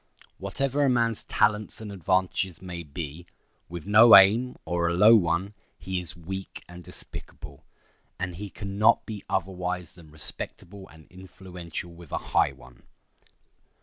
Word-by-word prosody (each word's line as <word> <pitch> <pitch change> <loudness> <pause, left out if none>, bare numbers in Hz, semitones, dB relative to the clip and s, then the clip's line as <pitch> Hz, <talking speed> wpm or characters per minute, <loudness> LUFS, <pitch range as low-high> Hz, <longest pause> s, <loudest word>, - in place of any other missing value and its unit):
Whatever 135 +8 -1
a 140 - +3
man's 115 -3 0
talents 105 0 +1
and 110 -2 -7
advantages 95 -1 -1
may 90 -2 -7
be, 80 +2 -8 0.4
with 85 -1 -7
no 110 +3 +8
aim, 110 +6 +6
or 85 -1 0
a 85 - -1
low 105 +5 +7
one, 90 0 +1 0.2
he 95 -1 -3
is 90 0 -6
weak 95 +3 -7
and 90 0 -11
despicable; 70 -4 -10 0.5
and 90 -2 -4
he 100 +1 -6
can 100 -1 -7
not 110 +2 +4
be 105 -3 -7
otherwise 90 -2 -3
than 85 -3 -16
respectable 85 +5 -5
and 80 -1 -17
influential 90 -2 -8
with 85 -2 -14
a - - -1 0.2
high - - +4
one. 65 -1 -17
95 Hz, 150 wpm, -26 LUFS, 85-105 Hz, 0.5 s, no